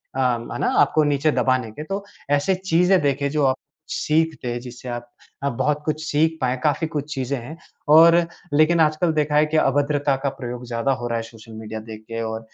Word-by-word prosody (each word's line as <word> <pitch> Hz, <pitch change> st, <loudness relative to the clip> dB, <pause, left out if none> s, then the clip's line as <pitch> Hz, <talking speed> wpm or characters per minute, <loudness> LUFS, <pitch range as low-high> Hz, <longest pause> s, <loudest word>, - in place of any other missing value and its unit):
अ, 135 Hz, -, -2 dB
है 120 Hz, -2 st, -1 dB
ना -, -, +1 dB
आपको 155 Hz, -, +3 dB
नीचे 145 Hz, +1 st, +2 dB
दबाने 130 Hz, -5 st, +1 dB
के। 150 Hz, +7 st, -7 dB
तो 195 Hz, +4 st, -4 dB, 0.3 s
ऐसे 165 Hz, +7 st, +2 dB
चीज़ें 180 Hz, 0 st, +2 dB
देखें 140 Hz, 0 st, 0 dB
जो 150 Hz, -2 st, +1 dB
आप 130 Hz, 0 st, +2 dB, 0.3 s
सीखते 155 Hz, -5 st, 0 dB
हैं 120 Hz, -, -3 dB
जिससे 125 Hz, 0 st, -10 dB
आप 120 Hz, 0 st, -5 dB, 0.4 s
आप 140 Hz, -, +1 dB
बहुत 150 Hz, +5 st, 0 dB
कुछ 155 Hz, 0 st, -2 dB
सीख 160 Hz, +1 st, +1 dB
पाएँ 130 Hz, 0 st, 0 dB
काफ़ी 155 Hz, +2 st, +1 dB
कुछ 150 Hz, -1 st, -4 dB
चीजें 135 Hz, 0 st, -2 dB
हैं। 150 Hz, +8 st, -9 dB, 0.4 s
और 165 Hz, +1 st, +8 dB, 0.4 s
लेकिन 155 Hz, +3 st, +4 dB
आजकल 160 Hz, +2 st, +2 dB
देखा 150 Hz, -1 st, 0 dB
है 150 Hz, +1 st, +5 dB
कि 155 Hz, +1 st, -1 dB
अभद्रता 145 Hz, 0 st, +2 dB
का 140 Hz, -, +2 dB
प्रयोग 125 Hz, -1 st, -6 dB
ज़्यादा 120 Hz, +3 st, 0 dB
हो 120 Hz, -, -2 dB
रहा 115 Hz, -1 st, -1 dB
है 115 Hz, -, -3 dB
सोशल 115 Hz, 0 st, -13 dB
मीडिया 110 Hz, 0 st, -6 dB
देख 110 Hz, 0 st, -10 dB
के 115 Hz, 0 st, -4 dB
और 110 Hz, 0 st, -3 dB
140 Hz, 210 wpm, -22 LUFS, 120-155 Hz, 0.4 s, और